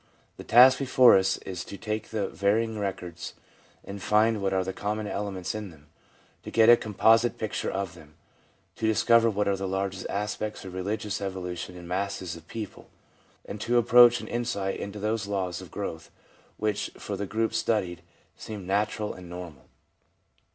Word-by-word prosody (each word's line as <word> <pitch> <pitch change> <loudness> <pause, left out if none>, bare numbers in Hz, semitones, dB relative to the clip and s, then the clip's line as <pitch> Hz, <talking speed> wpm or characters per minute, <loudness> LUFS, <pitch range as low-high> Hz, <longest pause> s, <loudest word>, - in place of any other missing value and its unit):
The - - -8
task 125 +3 +7
before 130 -2 +6
us 95 0 +2
is 90 -2 -5
to 100 - -8
take 110 0 -4
the 105 -3 -1
varying 110 +2 0
records 90 -4 -5 0.5
and 100 0 -8
find 110 +1 +3
what 95 -1 0
are 95 -1 +1
the 95 +1 -4
common 105 +2 -3
elements 100 -3 -3
in 105 -2 -5
them; 75 -3 -18 0.5
to - - -8
get 115 0 +5
a 120 - +10
composite 115 +2 +3
picture 110 - -3
of 95 -2 -3
them; 75 -3 -16 0.6
to 110 - 0
discover 115 +1 +4
what 105 -1 -1
are 100 - +2
the 95 0 -4
larger 95 0 -3
aspects 105 0 -3
of 95 - -8
religious 100 +2 -3
evolution 90 -2 -5
in 85 -1 -10
masses 95 -1 -3
of 85 0 -14
people, 110 -2 -8 0.6
and 105 - -7
to 120 +2 +1
approach 120 0 +7
an - - -8
insight 115 -5 -2
into 100 +1 -6
those 105 0 -2
laws 95 -4 -2
of - - -11
growth 80 -1 -6 0.5
which, 105 -1 -1
for - - -5
the 100 - -4
groups 110 +2 0
studied, 95 -7 -1 0.3
seem 105 -4 -8
natural 105 +2 -1
and 90 -1 -11
normal. 85 -5 -9
100 Hz, 170 wpm, -27 LUFS, 95-110 Hz, 0.6 s, a